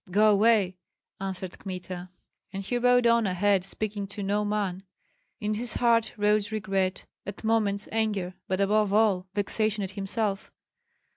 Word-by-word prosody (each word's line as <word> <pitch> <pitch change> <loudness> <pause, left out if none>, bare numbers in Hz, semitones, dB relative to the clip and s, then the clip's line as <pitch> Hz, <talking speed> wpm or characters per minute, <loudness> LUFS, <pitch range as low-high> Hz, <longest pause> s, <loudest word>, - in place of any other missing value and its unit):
"Go 210 +3 +5
away!" 205 -3 +3 0.4
answered 190 -1 -5
Kmita. 185 -1 -6 0.4
And 195 0 -5
he 245 +5 -1
rode 245 0 +4
on 235 -2 +4
ahead, 190 +1 +2
speaking 205 +1 -4
to 200 +1 -6
no 205 +2 0
man. 205 -3 -1 0.6
In 210 0 -1
his 230 +2 -3
heart 230 -2 +2
rose 210 0 +2
regret, 195 -3 -1 0.2
at 200 +3 -8
moments 210 -2 +1
anger, 210 -5 -1
but 185 0 -1
above 205 +1 +2
all, 200 -3 +3
vexation 210 0 0
at 190 - -4
himself. 200 +1 -2
205 Hz, 145 wpm, -27 LUFS, 195-215 Hz, 0.6 s, Go